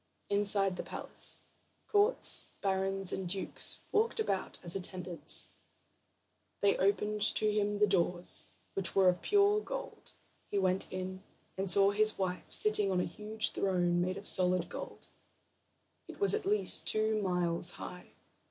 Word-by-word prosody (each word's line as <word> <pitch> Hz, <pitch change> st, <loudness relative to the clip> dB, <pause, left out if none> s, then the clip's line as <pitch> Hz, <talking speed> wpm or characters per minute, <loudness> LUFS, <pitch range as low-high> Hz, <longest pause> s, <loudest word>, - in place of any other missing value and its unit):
Inside 200 Hz, -2 st, +2 dB
the -, -, -3 dB
palace, -, -, -4 dB, 0.4 s
counts, 420 Hz, +4 st, +2 dB
barons, 195 Hz, -1 st, 0 dB
and 190 Hz, -2 st, -4 dB
dukes 190 Hz, 0 st, +3 dB
walked 445 Hz, +2 st, 0 dB
about 195 Hz, -, -3 dB
as 170 Hz, 0 st, +1 dB
attendants, 180 Hz, -4 st, +3 dB, 1.1 s
and -, -, -45 dB
they -, -, -6 dB
opened 205 Hz, +2 st, 0 dB
to 215 Hz, +1 st, +4 dB
him 205 Hz, 0 st, -1 dB
the 210 Hz, -, +3 dB
doors, 180 Hz, -2 st, -1 dB, 0.3 s
which 195 Hz, -1 st, +2 dB
were 190 Hz, -2 st, +5 dB
of 180 Hz, -1 st, -2 dB
pure 410 Hz, +1 st, +2 dB
gold. -, -, -8 dB, 0.4 s
He 205 Hz, -, -3 dB
went 190 Hz, -1 st, 0 dB
in, 185 Hz, 0 st, -6 dB, 0.3 s
and 190 Hz, 0 st, -3 dB
saw 195 Hz, +2 st, +4 dB
his 215 Hz, +1 st, +3 dB
wife 185 Hz, -1 st, -3 dB
sitting 210 Hz, -1 st, +1 dB
on 185 Hz, -, 0 dB
a -, -, -1 dB
huge 215 Hz, +4 st, -3 dB
throne 175 Hz, -2 st, 0 dB
made 185 Hz, +2 st, -2 dB
of 200 Hz, -, -10 dB
solid 180 Hz, -1 st, +1 dB
gold. -, -, -9 dB, 1.0 s
It -, -, -12 dB
was 400 Hz, -, +4 dB
at 430 Hz, -2 st, -2 dB
least 420 Hz, +1 st, 0 dB
two 215 Hz, 0 st, +2 dB
miles 175 Hz, -2 st, -1 dB
high. 180 Hz, 0 st, -10 dB
195 Hz, 150 wpm, -31 LUFS, 180-215 Hz, 1.1 s, were